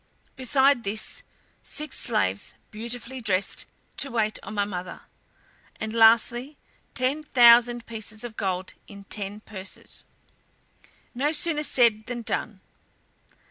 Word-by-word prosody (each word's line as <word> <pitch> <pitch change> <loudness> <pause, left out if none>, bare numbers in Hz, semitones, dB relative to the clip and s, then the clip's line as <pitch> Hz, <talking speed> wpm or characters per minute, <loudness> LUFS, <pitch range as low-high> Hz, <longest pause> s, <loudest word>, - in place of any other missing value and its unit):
Besides 265 0 +3
this, 215 +1 -4 0.4
six 300 0 -4
slaves, 100 - 0 0.2
beautifully 235 +3 -5
dressed, 195 -3 0 0.3
to 275 - +2
wait 220 -3 0
on 215 - -8
my 205 -1 +1
mother; 180 -2 -6 0.8
and 220 0 -4
lastly, 235 +5 +4 0.4
ten 265 +4 +1
thousand 240 -3 +5
pieces 215 -1 -5
of 235 -2 -7
gold 190 -2 -2
in 200 -1 -11
ten 205 +1 -3
purses." 195 -3 -7 1.1
No 275 +4 0
sooner 310 0 +3
said 235 -7 +3
then 245 -1 -5
done. 210 -3 -3
230 Hz, 115 wpm, -25 LUFS, 210-255 Hz, 1.1 s, thousand